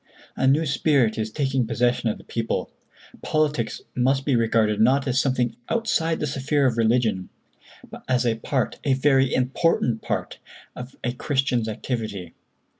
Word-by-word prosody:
A 130 - +1
new 150 +4 +3
spirit 135 -6 +2
is 110 0 -2
taking 135 -3 0
possession 120 0 +1
of - - -3
the - - -15
people. 115 -1 -3 0.5
Politics 150 -7 -1
must 135 +2 +1
be 140 - +2
regarded 110 -2 +2
not 135 +4 +3
as 130 0 +1
something 125 -4 0
outside 165 -8 0
the - - -1
sphere 140 +1 0
of 125 -3 +2
religion, 115 -5 +1 0.6
but - - -11
as 125 -1 +1
a 115 -2 +1
part—a 135 +3 -1
very 135 -1 +3
important 125 -2 +1
part—of 125 +1 -7
a 120 - -1
Christian's 130 -3 0
activity. 105 -6 -4
125 Hz, 145 wpm, -24 LUFS, 115-135 Hz, 0.6 s, new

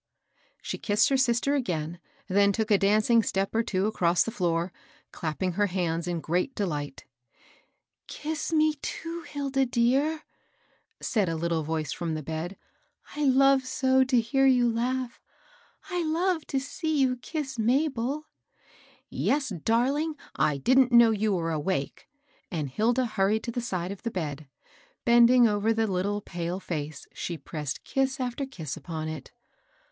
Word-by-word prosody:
She - - -4
kissed 205 -1 +2
her 275 - +2
sister 260 +1 +2
again; 175 - -2 0.3
then 200 +1 +4
took 220 +2 -1
a 200 - +5
dancing 215 +3 +4
step 195 -2 -1
or 225 - +3
two 200 -4 -1
across 175 -5 +2
the 225 - -4
floor, 175 -4 -1 0.4
clapping 170 +3 -2
her 205 +4 +1
hands 175 -2 -1
in 170 -2 -2
great 180 - -1
delight 145 -9 -3 1.0
^^ - - -50
Kiss 310 +1 -4
me, 310 -1 +3
too, 335 +1 -5
Hilda 275 -3 -1
dear! 270 +7 +1 0.4
" - - -38 0.3
said 210 -8 +1
a 165 - -1
little 165 0 -1
voice 155 -2 -2
from 165 -2 -3
the 155 - -4
bed. 160 +5 -5 0.5
'^ - - -12
T 295 0 -1
love 270 0 +4
so 260 0 +3
to 255 -2 +3
hear 270 +4 +2
you 250 -2 +4
laugh 245 +1 -2 0.7
I 360 - -1
I - - 0
love 330 +1 0
to 270 - 0
see 310 +3 -2
you 260 -2 +2
kiss 270 -1 -5
Mabel." 265 +3 0 0.5
" - - -26 0.2
Yes, 285 -2 0
darling 250 - 0 0.2
1 - - +3
1 145 -2 -3
didn't 260 - +4
know 235 -1 +7
you 215 0 +1
were 165 -2 -1
awake; 155 -1 -3 0.2
" - - -36
and 155 -6 -2
Hilda 235 - +1
hurried 215 -1 +1
to 235 - -3
the 245 - -3
side 185 -5 -3
of 200 - -8
the 230 - -2
bed. 155 -7 -4 0.6
Bend 235 0 +7
ing 245 -1 +6
over 210 +1 +1
the 225 0 +1
little, 200 +1 -1
pale 175 0 -4
face, 155 -5 -5
she 170 - -4
pressed 150 -4 -5
kiss 270 0 -1
after 255 +2 -3
kiss 160 - -6
upon 160 -2 -5
it. 155 -3 -7
220 Hz, 170 wpm, -27 LUFS, 175-265 Hz, 1.0 s, know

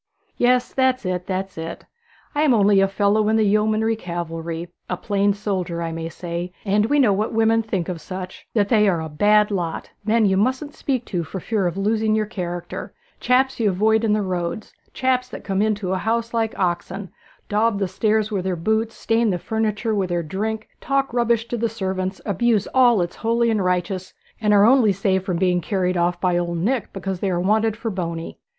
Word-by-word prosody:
'Yes; 250 0 +2
that's 260 -3 +1
it, 180 -1 -2
that's 190 -2 -3
it. 165 +1 -6 0.5
I 295 - 0
am 290 -5 +4
only 200 -2 +4
a 195 - +4
fellow 205 +2 +2
in 220 - +3
the 220 - +3
yeomanry 215 +2 +2
cavalry 170 -3 -5 0.2
a 180 - -1
plain 200 0 +1
soldier, 190 -4 -2
I 165 - -3
may 165 0 -4
say; 175 +1 -5
and 205 +2 +2
we 290 - +2
know 245 -8 +4
what 210 +4 -1
women 225 0 +3
think 195 -6 -3
of 175 -3 -4
such: 185 0 -8
that 205 -2 +2
they 210 -3 +4
are 175 -3 +1
a 160 0 -5
bad 210 +7 +3
lot 175 -5 -3
men 220 +1 +3
you 190 -1 +3
mustn't 260 +7 0
speak 255 -4 -2
to 175 -4 -2
for 175 +5 -6
fear 200 0 0
of 175 +1 -3
losing 215 +2 +1
your 215 0 +1
character 175 -5 -6 0.2
chaps 260 +1 +2
you 220 -3 +3
avoid 220 +4 +2
in 220 - +2
the 210 -1 +1
roads 180 +2 -3 0.2
chaps 255 -1 0
that - - -8
come 195 0 0
into 210 -3 0
a 190 - -1
house 230 +3 -1
like 225 -1 -1
oxen, 185 +1 -2 0.4
daub 215 +1 +1
the 195 -1 0
stairs 215 +3 0
wi' 200 -3 0
their 185 0 -1
boots, 220 +6 0
stain 230 0 +1
the 180 - 0
furniture 220 +3 -1
wi' 195 -3 0
their 175 -1 -1
drink, 215 +7 -3
talk 275 -2 0
rubbish 235 -1 +1
to 240 - -2
the 230 0 0
servants, 190 -3 -3
abuse 215 0 +1
all 245 -3 +5
that's 175 -2 -2
holy 235 +1 +1
and 210 -3 +1
righteous, 180 +1 -2 0.3
and 210 -1 +2
are 205 0 +6
only 240 -3 +5
saved 190 -1 0
from 185 -3 -2
being 180 -1 +2
carried 185 0 0
off 175 0 +1
by 180 -1 +1
Old 170 -1 -2
Nick 220 +6 -1
because 195 -1 -4
they 195 - -1
are 175 -2 0
wanted 215 +4 +1
for 225 -1 -3
Boney.' 170 -3 -5
205 Hz, 210 wpm, -22 LUFS, 180-225 Hz, 0.5 s, are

